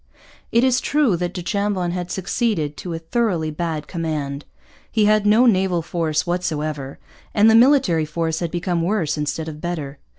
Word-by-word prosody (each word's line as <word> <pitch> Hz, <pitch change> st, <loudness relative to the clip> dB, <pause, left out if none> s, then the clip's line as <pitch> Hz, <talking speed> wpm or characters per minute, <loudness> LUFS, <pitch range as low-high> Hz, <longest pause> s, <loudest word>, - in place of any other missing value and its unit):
It 235 Hz, +2 st, +3 dB
is 260 Hz, -1 st, +3 dB
true 290 Hz, -10 st, +2 dB
that 175 Hz, 0 st, -2 dB
du 180 Hz, -1 st, -6 dB
Chambon 200 Hz, -2 st, -1 dB
had 180 Hz, 0 st, -4 dB
succeeded 190 Hz, -, -1 dB
to 175 Hz, -2 st, -5 dB
a -, -, -3 dB
thoroughly 165 Hz, -2 st, -1 dB
bad 155 Hz, -1 st, -3 dB
command. 150 Hz, -4 st, -4 dB, 0.5 s
He 215 Hz, -2 st, +2 dB
had 210 Hz, 0 st, +3 dB
no 220 Hz, +4 st, +5 dB
naval 190 Hz, -6 st, +2 dB
force 160 Hz, -2 st, -1 dB
whatever; 155 Hz, -5 st, -3 dB, 0.4 s
and 215 Hz, +1 st, +6 dB
the -, -, +4 dB
military 230 Hz, -, +4 dB
force 160 Hz, +1 st, -2 dB
had 170 Hz, -, -2 dB
become 175 Hz, 0 st, -1 dB
worse 170 Hz, -4 st, 0 dB
instead 155 Hz, +1 st, -3 dB
of 155 Hz, -1 st, -7 dB
better. 155 Hz, -5 st, -4 dB
175 Hz, 170 wpm, -21 LUFS, 155-205 Hz, 0.5 s, and